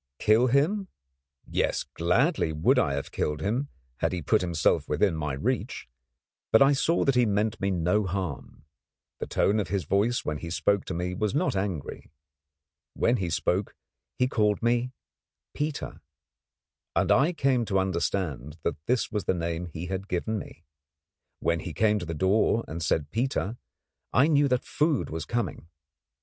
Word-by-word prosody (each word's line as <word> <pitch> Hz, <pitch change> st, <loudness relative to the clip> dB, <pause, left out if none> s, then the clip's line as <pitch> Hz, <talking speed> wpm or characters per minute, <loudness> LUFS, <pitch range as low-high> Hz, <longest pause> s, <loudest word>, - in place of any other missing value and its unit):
Kill 110 Hz, -, +4 dB
him? 160 Hz, -, +2 dB, 0.6 s
Yes, -, -, 0 dB
gladly 90 Hz, -, +1 dB
would 85 Hz, -, +3 dB
I 80 Hz, -, +1 dB
have 70 Hz, -, -4 dB
killed 75 Hz, 0 st, -1 dB
him, 120 Hz, -, -1 dB, 0.3 s
had -, -, 0 dB
he 90 Hz, -3 st, -3 dB
put 105 Hz, +7 st, +3 dB
himself 85 Hz, -3 st, +1 dB
within 80 Hz, +4 st, +2 dB
my 75 Hz, -2 st, -2 dB
reach; 65 Hz, -, -2 dB, 0.6 s
but 110 Hz, -, +7 dB
I 135 Hz, +1 st, +6 dB
saw 160 Hz, +5 st, +2 dB
that 135 Hz, -, +3 dB
he 125 Hz, -2 st, +3 dB
meant 105 Hz, +2 st, 0 dB
me 100 Hz, -, +1 dB
no 95 Hz, +3 st, +1 dB
harm. 85 Hz, -6 st, -5 dB, 0.5 s
The -, -, -4 dB
tone 105 Hz, +2 st, +2 dB
of 100 Hz, -, -1 dB
his 95 Hz, 0 st, -1 dB
voice 100 Hz, +9 st, +1 dB
when 75 Hz, -1 st, -2 dB
he 85 Hz, -, -6 dB
spoke 100 Hz, +3 st, +1 dB
to 90 Hz, -, -4 dB
me 90 Hz, +1 st, -2 dB
was 105 Hz, +5 st, -1 dB
not 155 Hz, -, +1 dB
angry. 95 Hz, -7 st, -4 dB, 0.9 s
Whenever 120 Hz, 0 st, +2 dB
he 90 Hz, -3 st, -1 dB
spoke 90 Hz, +4 st, -1 dB, 0.4 s
he 125 Hz, -, +3 dB
called 105 Hz, -3 st, +1 dB
me 120 Hz, +1 st, +1 dB, 0.6 s
'Peter,' 150 Hz, 0 st, -4 dB, 0.9 s
and -, -, +2 dB
I 140 Hz, +7 st, +4 dB
came 135 Hz, -7 st, +1 dB
to 100 Hz, -2 st, 0 dB
understand 85 Hz, -6 st, -1 dB
that 75 Hz, -, -2 dB
this 125 Hz, 0 st, +1 dB
was 105 Hz, -3 st, -2 dB
the -, -, +1 dB
name 85 Hz, 0 st, -3 dB
he 85 Hz, +1 st, -6 dB
had 95 Hz, +2 st, -4 dB
given 105 Hz, +4 st, -1 dB
me. -, -, -11 dB, 0.8 s
When 85 Hz, 0 st, +1 dB
he 80 Hz, +1 st, -6 dB
came 105 Hz, -1 st, +3 dB
to 85 Hz, -, -6 dB
the 80 Hz, -, -3 dB
door 105 Hz, +6 st, +2 dB
and 85 Hz, +1 st, -5 dB
said 75 Hz, -1 st, 0 dB
'Peter,' 115 Hz, -2 st, -1 dB, 0.6 s
I 125 Hz, -, +5 dB
knew 145 Hz, -2 st, +4 dB
that 125 Hz, -1 st, +1 dB
food 150 Hz, -2 st, 0 dB
was 80 Hz, -1 st, -4 dB
coming. 110 Hz, -7 st, -3 dB
100 Hz, 170 wpm, -27 LUFS, 85-120 Hz, 0.9 s, but